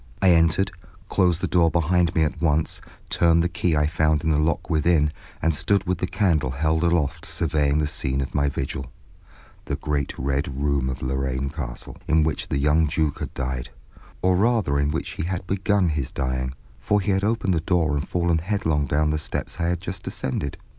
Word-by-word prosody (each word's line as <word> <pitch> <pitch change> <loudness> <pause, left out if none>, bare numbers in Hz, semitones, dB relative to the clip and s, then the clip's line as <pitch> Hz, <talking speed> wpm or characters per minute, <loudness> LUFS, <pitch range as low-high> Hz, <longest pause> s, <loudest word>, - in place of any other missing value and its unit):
I 95 -2 +5
entered, 85 +3 +3 0.4
closed 90 -2 +2
the - - 0
door 85 -2 +3
behind 85 +1 +1
me 80 - +4
at 75 - -2
once, 80 -1 +1 0.3
turned 85 -1 +4
the - - +2
key 85 -1 0
I 75 0 +3
found 80 0 +1
in 80 - +1
the 75 - +2
lock 75 0 0
within, 75 -1 +2 0.3
and 80 +1 +3
stood 100 +6 +1
with 90 -1 -1
the 90 - -1
candle 90 - +1
held 80 +5 0
aloft 85 -4 +1
surveying 75 -3 +1
the 75 - +1
scene 65 -2 -2
of 65 - -3
my 70 0 +2
vigil, 70 -1 -4 0.8
the - - -2
great 70 -2 -2
Red 70 +1 -1
Room 70 -2 +1
of 65 0 -5
Lorraine 65 +1 -1
Castle, - - -6
in 80 0 +4
which 80 -1 -1
the - - -1
young 75 +3 +3
Duke 75 -1 0
had - - -6
died; 65 -2 -3 0.5
or 95 0 +4
rather 105 -9 +2
in 70 0 +1
which 80 - -2
he - - -4
had 90 0 -3
begun 95 0 +1
his 75 -5 -2
dying, 65 -1 -2 0.2
for 105 - +1
he 100 +1 0
had 95 0 +1
opened 105 -3 +1
the 80 - 0
door 80 -3 +1
and 70 - -2
fallen 85 -2 +1
headlong 80 -6 0
down 75 +3 +1
the 75 - 0
steps 75 - -4
I 85 - +1
had 85 -1 -1
just 95 0 -6
ascended. 65 +1 -3
80 Hz, 200 wpm, -24 LUFS, 70-90 Hz, 0.8 s, I